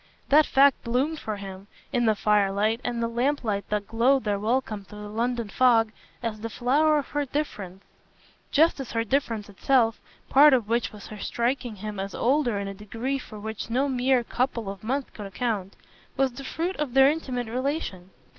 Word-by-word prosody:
That 300 Hz, +2 st, +6 dB
fact 275 Hz, 0 st, +4 dB
bloomed 270 Hz, +7 st, 0 dB
for 215 Hz, -, -4 dB
him, 195 Hz, 0 st, -9 dB, 0.3 s
in 240 Hz, -2 st, +2 dB
the 215 Hz, -, +4 dB
firelight 210 Hz, +2 st, +2 dB
and 235 Hz, -1 st, -2 dB
lamplight 240 Hz, -6 st, 0 dB
that 210 Hz, -1 st, -1 dB
glowed 250 Hz, +4 st, +3 dB
their 205 Hz, -2 st, 0 dB
welcome 220 Hz, -1 st, -1 dB
through 210 Hz, +2 st, -11 dB
the 210 Hz, -, -7 dB
London 235 Hz, +1 st, -1 dB
fog, 225 Hz, 0 st, +3 dB, 0.3 s
as 220 Hz, -2 st, -3 dB
the 230 Hz, -, -4 dB
flower 295 Hz, +7 st, +2 dB
of 285 Hz, -, -3 dB
her 290 Hz, 0 st, -1 dB
difference; 205 Hz, -10 st, -4 dB, 0.7 s
just 315 Hz, +1 st, +3 dB
as 270 Hz, -, -6 dB
her 230 Hz, 0 st, +1 dB
difference 230 Hz, -3 st, -1 dB
itself 225 Hz, +2 st, +2 dB, 0.3 s
part 290 Hz, +2 st, +7 dB
of 235 Hz, -5 st, -1 dB
which 235 Hz, +1 st, 0 dB
was 210 Hz, -2 st, -11 dB
her 215 Hz, -, -9 dB
striking 240 Hz, 0 st, -1 dB
him 210 Hz, 0 st, -6 dB
as 195 Hz, 0 st, -4 dB
older 250 Hz, -3 st, +1 dB
in 200 Hz, 0 st, -3 dB
a 195 Hz, -, -5 dB
degree 225 Hz, +7 st, -3 dB
for 215 Hz, -4 st, -10 dB
which 220 Hz, +1 st, -6 dB
no 260 Hz, +5 st, +1 dB
mere 255 Hz, -1 st, +2 dB
couple 235 Hz, -4 st, -2 dB
of 195 Hz, 0 st, -11 dB
months 265 Hz, +4 st, -2 dB
could 205 Hz, -2 st, -8 dB
account 200 Hz, -2 st, -3 dB, 0.4 s
was 270 Hz, -1 st, +2 dB
the 275 Hz, +3 st, -8 dB
fruit 345 Hz, +7 st, -3 dB
of 290 Hz, -4 st, -3 dB
their 270 Hz, 0 st, +8 dB
intimate 255 Hz, -6 st, -3 dB
relation. 245 Hz, -, -3 dB
235 Hz, 185 wpm, -26 LUFS, 210-270 Hz, 0.7 s, their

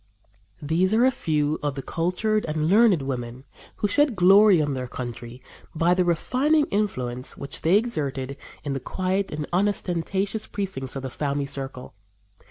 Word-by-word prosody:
" 100 Hz, -1 st, -35 dB
These 175 Hz, +7 st, +2 dB
are 235 Hz, +3 st, +4 dB
a 260 Hz, -, +4 dB
few 155 Hz, -, -1 dB
of 145 Hz, -2 st, -2 dB
the 135 Hz, -, -5 dB
cultured 210 Hz, +6 st, 0 dB
and 155 Hz, 0 st, -1 dB
learned 200 Hz, -5 st, +4 dB
women 125 Hz, -1 st, -5 dB, 0.3 s
who 205 Hz, -, 0 dB
shed 285 Hz, +3 st, +2 dB
glory 195 Hz, +1 st, +6 dB
on 145 Hz, -2 st, 0 dB
their 130 Hz, -1 st, -4 dB
country 120 Hz, 0 st, -7 dB, 0.3 s
by 170 Hz, +3 st, +3 dB
the 180 Hz, 0 st, +2 dB
refining 265 Hz, -, +2 dB
influence 130 Hz, -12 st, -2 dB
which 140 Hz, -, -6 dB
they 175 Hz, +5 st, +4 dB
exerted 140 Hz, -, -2 dB, 0.3 s
in 145 Hz, -2 st, -2 dB
the 135 Hz, -, -2 dB
quiet 190 Hz, +7 st, -2 dB
and 150 Hz, 0 st, -3 dB
unostentatious 195 Hz, +2 st, -1 dB
precincts 180 Hz, -11 st, -4 dB
of 135 Hz, -, -5 dB
the 130 Hz, -, -5 dB
family 140 Hz, 0 st, -2 dB
circle. 135 Hz, -3 st, -6 dB
160 Hz, 165 wpm, -24 LUFS, 135-200 Hz, 0.3 s, glory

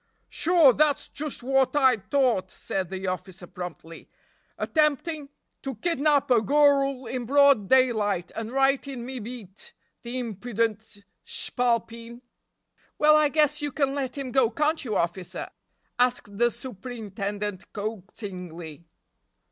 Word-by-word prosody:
"Sure, 330 Hz, -6 st, +5 dB
dat's 295 Hz, +2 st, +1 dB
just 295 Hz, -4 st, -5 dB
wot 270 Hz, +2 st, +2 dB
I 260 Hz, -4 st, +5 dB
t'ought," 235 Hz, -4 st, +1 dB
said 185 Hz, -1 st, -4 dB
the 190 Hz, 0 st, -5 dB
officer 185 Hz, 0 st, -5 dB
promptly; 175 Hz, -3 st, -9 dB, 0.5 s
"attempting 300 Hz, -1 st, 0 dB, 0.3 s
to 270 Hz, -2 st, -5 dB
kidnap 290 Hz, 0 st, +1 dB
a 235 Hz, -3 st, +5 dB
gurrul 275 Hz, +1 st, +3 dB
in 245 Hz, 0 st, -4 dB
broad 280 Hz, -6 st, +5 dB
daylight 220 Hz, -9 st, +2 dB
and 225 Hz, 0 st, -4 dB
right 270 Hz, +1 st, +2 dB
in 255 Hz, -4 st, -6 dB
me 260 Hz, 0 st, -5 dB
beat, 230 Hz, -, -9 dB, 0.3 s
the 240 Hz, +1 st, -5 dB
impudent 220 Hz, -2 st, -3 dB, 0.2 s
shpalpeen!" 235 Hz, -1 st, -2 dB, 0.8 s
"Well, 305 Hz, 0 st, +6 dB
I 305 Hz, -1 st, +4 dB
guess 300 Hz, 0 st, +2 dB
you 290 Hz, -1 st, -2 dB
can 275 Hz, 0 st, 0 dB
let 270 Hz, -2 st, -3 dB
him 270 Hz, -2 st, -4 dB
go, 260 Hz, -3 st, +3 dB
can't 300 Hz, +7 st, 0 dB
you, 220 Hz, -5 st, -3 dB
officer?" 175 Hz, +2 st, -3 dB, 0.5 s
asked 245 Hz, -5 st, +1 dB
the 240 Hz, +3 st, +3 dB
superintendent 205 Hz, -5 st, -6 dB
coaxingly. 180 Hz, -6 st, -7 dB
245 Hz, 125 wpm, -26 LUFS, 205-275 Hz, 0.8 s, Well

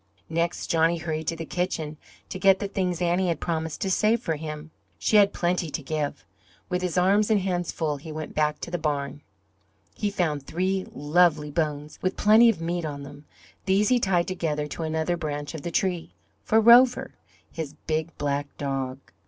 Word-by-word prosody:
Next 170 Hz, +1 st, -1 dB
Johnny 165 Hz, +1 st, +2 dB
hurried 160 Hz, -1 st, -4 dB
to 165 Hz, -, 0 dB
the 165 Hz, 0 st, -6 dB
kitchen 160 Hz, -3 st, -2 dB, 0.3 s
to 185 Hz, -, -5 dB
get 195 Hz, 0 st, +5 dB
the 200 Hz, -, -3 dB
things 180 Hz, -3 st, -1 dB
Annie 175 Hz, +2 st, +2 dB
had 170 Hz, -, 0 dB
promised 160 Hz, -2 st, -3 dB
to 190 Hz, -, 0 dB
save 220 Hz, +4 st, +3 dB
for 165 Hz, -8 st, -2 dB
him. 155 Hz, 0 st, -7 dB, 0.3 s
She 215 Hz, -, +3 dB
had 200 Hz, -1 st, +6 dB
plenty 175 Hz, -1 st, -1 dB
to 150 Hz, -, -4 dB
give. 145 Hz, -8 st, -3 dB, 0.4 s
With 180 Hz, -1 st, -1 dB
his 180 Hz, -1 st, -2 dB
arms 200 Hz, +4 st, +3 dB
and 215 Hz, -2 st, +4 dB
hands 180 Hz, -2 st, -1 dB
full 150 Hz, -3 st, -2 dB
he 155 Hz, +3 st, -9 dB
went 155 Hz, 0 st, -6 dB
back 150 Hz, -1 st, +1 dB
to 170 Hz, -, -6 dB
the 175 Hz, -, -2 dB
barn. 145 Hz, -2 st, -2 dB, 0.7 s
He 205 Hz, -, -1 dB
found 165 Hz, -7 st, -1 dB
three 185 Hz, +3 st, -1 dB
"lovely" 150 Hz, 0 st, +2 dB
bones 150 Hz, -1 st, -2 dB
with 185 Hz, 0 st, -1 dB
plenty 220 Hz, +3 st, +6 dB
of 225 Hz, -, 0 dB
meat 170 Hz, +1 st, -2 dB
on 145 Hz, -2 st, -5 dB
them; 145 Hz, +1 st, -11 dB, 0.4 s
these 200 Hz, +3 st, +3 dB
he 250 Hz, -1 st, +4 dB
tied 180 Hz, -5 st, +1 dB
together 160 Hz, -5 st, -2 dB
to -, -, -6 dB
another 160 Hz, +2 st, -1 dB
branch 145 Hz, -2 st, -4 dB
of 160 Hz, -, -6 dB
the 170 Hz, -, -4 dB
tree, 175 Hz, -1 st, -1 dB, 0.3 s
for 220 Hz, -, +3 dB
Rover, 240 Hz, +3 st, +6 dB, 0.4 s
his 150 Hz, -3 st, -6 dB
big 160 Hz, +1 st, -2 dB
black 145 Hz, 0 st, -1 dB
dog. 135 Hz, -2 st, -3 dB
165 Hz, 190 wpm, -26 LUFS, 150-185 Hz, 0.7 s, had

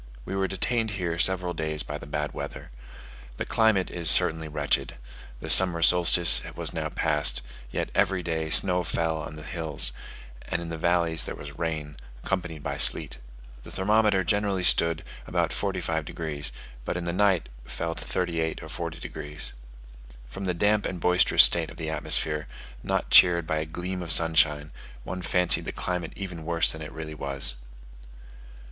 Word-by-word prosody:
We -, -, -5 dB
were 95 Hz, 0 st, 0 dB
detained 110 Hz, +4 st, -1 dB
here 85 Hz, -3 st, -3 dB
several 90 Hz, -1 st, +2 dB
days 80 Hz, -2 st, -3 dB
by 75 Hz, 0 st, -7 dB
the 70 Hz, -, -11 dB
bad 75 Hz, +1 st, -3 dB
weather. -, -, -8 dB, 0.7 s
The -, -, -4 dB
climate 110 Hz, -4 st, +1 dB
is 85 Hz, -3 st, +2 dB
certainly 80 Hz, -1 st, +4 dB
wretched: 70 Hz, -3 st, -1 dB, 0.4 s
the -, -, -8 dB
summer 90 Hz, -3 st, +6 dB
solstice 85 Hz, -1 st, +6 dB
was -, -, -1 dB
now -, -, -3 dB
passed, 75 Hz, -5 st, 0 dB, 0.3 s
yet -, -, -4 dB
every 90 Hz, -1 st, 0 dB
day 80 Hz, -1 st, -3 dB
snow 90 Hz, +2 st, +4 dB
fell 80 Hz, -1 st, -2 dB
on 75 Hz, 0 st, -8 dB
the 75 Hz, -, -10 dB
hills, 80 Hz, -7 st, 0 dB, 0.6 s
and 85 Hz, -, -2 dB
in 85 Hz, -1 st, -7 dB
the 85 Hz, -, -5 dB
valleys 85 Hz, -2 st, +1 dB
there -, -, -6 dB
was 70 Hz, 0 st, -11 dB
rain, 75 Hz, -3 st, -4 dB, 0.3 s
accompanied 90 Hz, -6 st, -4 dB
by -, -, -4 dB
sleet. -, -, +5 dB, 0.4 s
The -, -, -13 dB
thermometer 105 Hz, 0 st, +1 dB
generally 100 Hz, -2 st, -1 dB
stood 85 Hz, -2 st, +2 dB, 0.2 s
about -, -, -1 dB
45 85 Hz, -6 st, -2 dB
degs., 75 Hz, -3 st, -5 dB, 0.3 s
but 85 Hz, -, -4 dB
in 90 Hz, -, -4 dB
the 85 Hz, 0 st, -3 dB
night 95 Hz, -2 st, +1 dB, 0.2 s
fell 85 Hz, 0 st, -4 dB
to -, -, -8 dB
38 85 Hz, -3 st, -3 dB
or 80 Hz, -, -10 dB
40 85 Hz, -1 st, -6 dB
degs. 75 Hz, +1 st, -5 dB, 0.7 s
From 95 Hz, +11 st, -8 dB
the 90 Hz, -2 st, -2 dB
damp 105 Hz, +3 st, +1 dB
and 90 Hz, -, -6 dB
boisterous 90 Hz, +2 st, +5 dB
state -, -, +3 dB
of -, -, -13 dB
the 80 Hz, -1 st, -4 dB
atmosphere, 75 Hz, -1 st, 0 dB, 0.3 s
not -, -, -3 dB
cheered 85 Hz, -2 st, +6 dB
by 80 Hz, 0 st, -2 dB
a 80 Hz, -, -3 dB
gleam 90 Hz, +3 st, -5 dB
of 85 Hz, -2 st, -2 dB
sunshine, 80 Hz, -3 st, +3 dB, 0.3 s
one 90 Hz, +5 st, -6 dB
fancied 90 Hz, 0 st, +2 dB
the -, -, -4 dB
climate 90 Hz, -2 st, -5 dB
even 90 Hz, -5 st, -7 dB
worse 85 Hz, +1 st, +3 dB
than 80 Hz, -, -6 dB
it 75 Hz, -, -8 dB
really 80 Hz, -1 st, -8 dB
was. 70 Hz, -4 st, +2 dB
85 Hz, 170 wpm, -25 LUFS, 80-90 Hz, 0.7 s, summer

